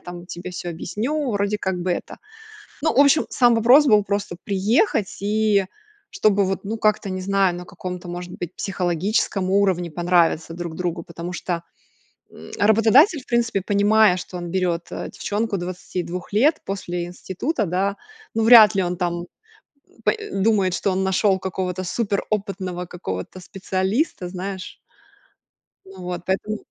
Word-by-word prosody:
там 175 -1 -9
тебе 175 0 -7
всё 175 -1 -5
объясню. 245 - -2
Вроде 205 +1 0
как 190 -2 -1
бы 185 - -1
это". - - -3 0.7
Ну, 320 - +1
в - - +2
общем, 285 +2 +4
сам 245 -2 +4
вопрос 250 +7 +6
был 210 -5 +5
просто 200 -3 -2
приехать 210 - +1
и 210 -1 +2 0.5
чтобы 200 -2 +2
вот, 190 0 -2
ну, 220 +3 -4
как-то 215 -2 +1
не 185 0 -3
знаю, 195 -2 +2
на 180 0 -8
каком-то 180 -1 -7
может 175 0 -6
быть 175 +1 -6
психологическом 185 +1 -1
уровне 190 -4 +1
понравиться 170 -1 +1
друг 170 -1 -6
другу. 175 -1 -3
Потому 170 +1 -7
что, 170 0 -3 0.7
м, 80 - -13
работодатель 225 - +5
в - - -25
принципе, 235 -4 +1
понимая, 205 -1 +4
что 180 0 -7
он 175 -1 -5
берёт, 175 -2 0
а, - - -5
девчонку 210 0 -2
22 180 0 -5
лет 290 +9 +3
после 175 -3 -4
института, 195 - -3
да, 195 +4 0 0.4
ну, 225 - +1
вряд 220 -3 +8
ли 190 - +3
он, 175 0 -2
там, 175 0 -2 0.8
по - - +5
э, 430 -1 -7
думает, 195 -2 +2
что 195 - 0
он 190 +1 0
нашёл 190 0 +2
какого-то 185 0 -3
супер 200 +1 -1
опытного 195 -4 -3
какого-то 130 - -6
специалиста, 190 - -2
знаешь. 190 +1 -6 1.1
Ну 190 -1 -12
вот, 180 -1 -4
поэтому. 205 +3 -1
190 Hz, 155 wpm, -22 LUFS, 180-215 Hz, 1.1 s, вряд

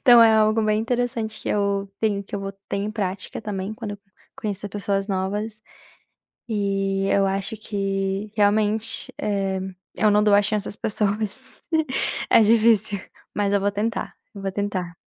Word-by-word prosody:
então 240 -3 +8
é 225 -1 +7
algo 215 0 +4
bem 215 0 +2
interessante 230 -2 -1
que - - -4
eu 200 -1 0
tenho, 205 -2 +1
que 200 - -9
eu 200 - -2
vou 195 0 -4 0.2
ter - - -1
em 205 +2 -1
prática 195 -2 -3
também 205 0 -3
quando 220 -3 -6
eu 205 - -8 0.4
conhecer 205 -1 -4
pessoas 200 0 -1
novas, 205 +3 -2 0.9
e 195 -2 0
eu 200 0 +4
acho 195 +3 -1
que 195 -1 -2
realmente, 210 +2 +1
eh, 195 -2 0 0.4
eu 215 -1 +4
não 210 0 +4
dou 210 -1 +4
a 205 - +5
chance 210 -1 -1
às - - -6
pessoas, 210 0 -1 0.7
é - - +7
difícil, 215 -2 +4 0.3
mas 205 -1 +1
eu 200 - +4
vou 200 +1 +1
tentar, 215 +3 -2 0.2
eu 200 - -7
vou 195 - -1
tentar. 190 -4 -3
205 Hz, 165 wpm, -24 LUFS, 195-215 Hz, 0.9 s, então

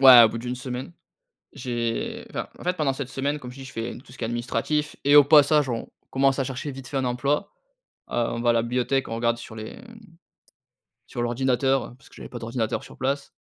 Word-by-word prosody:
Ouais, 130 -3 +11
au 110 - +5
bout 115 - -4
d'1 120 +2 -3
semaine, 125 -5 -5 0.6
j'ai 120 -2 -3
enfin, - - -4
en - - -11
fait, 180 +1 0
pendant 150 -5 +1
cette 135 -2 -4
semaine, 140 +3 -1
comme 125 -3 -8
je 125 - -12
t'ai 135 - -8
dis, - - -8
j'ai 115 +1 -3
fait - - -9
tout 125 0 -16
ce - - -14
qui - - -3
est - - 0
administratif 120 +6 -1
et 145 +1 +6
au 145 - +10
passage, 145 0 +6
on 115 -2 -3 0.2
commence 135 0 +3
à 135 - +1
chercher 135 +2 -4
vite 135 -1 -8
fait 135 - -4
un 130 - +1
emploi, 140 +9 0 0.6
heu, - - -5
on 115 0 0
va 120 0 +3
à - - +5
la 115 -1 +2
bibliothèque, 125 +3 0
on 115 - -3
regarde 115 0 +1
sur 115 -1 -10
les, 110 0 -7
mmh, 230 -1 -13 1.1
sur 120 - -4
l'ordinateur 130 +2 +1
parce 135 - -19
que - - -19
j'avais - - -9
pas 120 - -7
d'ordinateur 115 0 -2
sur - - -13
place. 140 +2 -1
125 Hz, 240 wpm, -25 LUFS, 120-140 Hz, 1.1 s, Ouais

